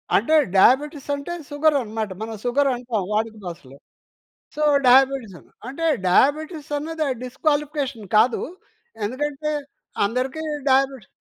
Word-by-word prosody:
అంటే 235 +10 +2 0.2
డయాబిటిస్ 285 - +3
అంటే 285 +5 -6 0.2
షుగరన్నమాట. 275 -8 0
మనం 220 0 -5
షుగరంటాం 245 -4 0
వాడుక 220 +1 -1
భాషలో. 140 -6 -9 0.8
సొ, 305 - -4 0.3
డయాబిటిసన్న 260 -6 +3 0.2
అంటే 275 +6 -4 0.2
డయాబిటిస్ 300 - +2
అన్నది 315 0 -3 0.2
డిస్‌క్వాలిఫి‌కేషన్ 280 -3 -2
కాదు. 240 +3 +3 0.6
ఎందుకంటే 295 +6 -3 0.6
అందరికి 255 +8 -2 0.3
డయాబిటిస్ 265 -4 +2
265 Hz, 95 wpm, -22 LUFS, 225-295 Hz, 0.8 s, డయాబిటిస్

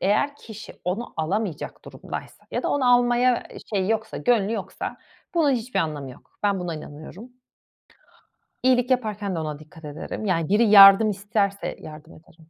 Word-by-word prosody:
eğer 245 +9 +1
kişi 220 -5 -11
onu 200 +7 -3
alamayacak 180 +1 -3
durumdaysa - - -9
ya - - -2
da - - -1
onu 255 -3 +3
almaya, 245 0 +2
eee, - - -10 0.2
şeyi 195 +1 0
yoksa 220 0 -2
gönlü 225 -3 +1
yoksa 205 -4 -5 0.4
bunun 310 -4 +3
hiçbir 245 0 -2
anlamı 145 -4 -4
yok. 125 - -18
Ben 200 -2 +1
buna 175 -2 -4
inanıyorum. 155 +10 -10 1.3
İyilik 255 0 +3
yaparken 210 -6 -1
de 165 - -2
ona 155 -2 -5
dikkat 155 +1 -14
ederim. 150 +8 -6
Yani 165 -4 0
biri 210 +4 +4
yardım 200 +1 +9
isterse 200 0 -2
yardım 155 +1 -11
ederim. 160 0 -20
200 Hz, 160 wpm, -24 LUFS, 165-235 Hz, 1.3 s, yardım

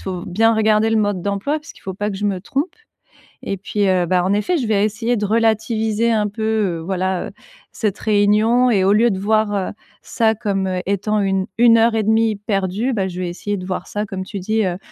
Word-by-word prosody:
faut 180 -2 -5
bien 225 +5 +2
regarder 220 0 +2
le 225 - +2
mode 205 -4 0
d'emploi, 205 +10 -1
parce 305 - -13
qu'il - - -20
faut 190 -1 -5
pas 205 +2 -2
que 195 - -5
je 205 - -4
me 195 -3 -1
trompe. 285 - -3 0.7
Et 195 - -4
puis, 200 +1 -1
heu, 185 -2 +2
bah, 180 +1 +1
en 190 - 0
effet, 325 - +1
je 250 - -2
vais 205 -2 +2
essayer 225 +3 -1
de 210 - -1
relativiser 220 +1 +1
un 210 -2 +1
peu, 220 +2 -6
heu, 215 -6 0
voilà, 185 +1 -2
heu, - - -10 0.4
cette 210 -4 -2
réunion. 215 +4 +3
Et 195 -5 +2
au 200 - +4
lieu 230 +3 +4
de 190 - -3
voir, 215 +1 +1
heu, 195 -2 -1 0.3
ça 225 -1 +1
comme 195 -3 -1 0.2
étant 205 +2 0
une 195 -1 0
une 230 -1 +6
heure 225 0 +3
et 220 - +1
demie 220 0 +2
perdue, 200 +4 -1
bah, 195 -4 -1
je 180 +1 -7
vais 180 - -2
essayer 205 +3 -4
de 180 - -7
voir 185 0 -4
ça, 210 0 -3
comme 190 -3 -5
tu 200 +1 -6
dis, 220 +4 0
heu, 180 -1 -2
210 Hz, 235 wpm, -19 LUFS, 190-220 Hz, 0.7 s, une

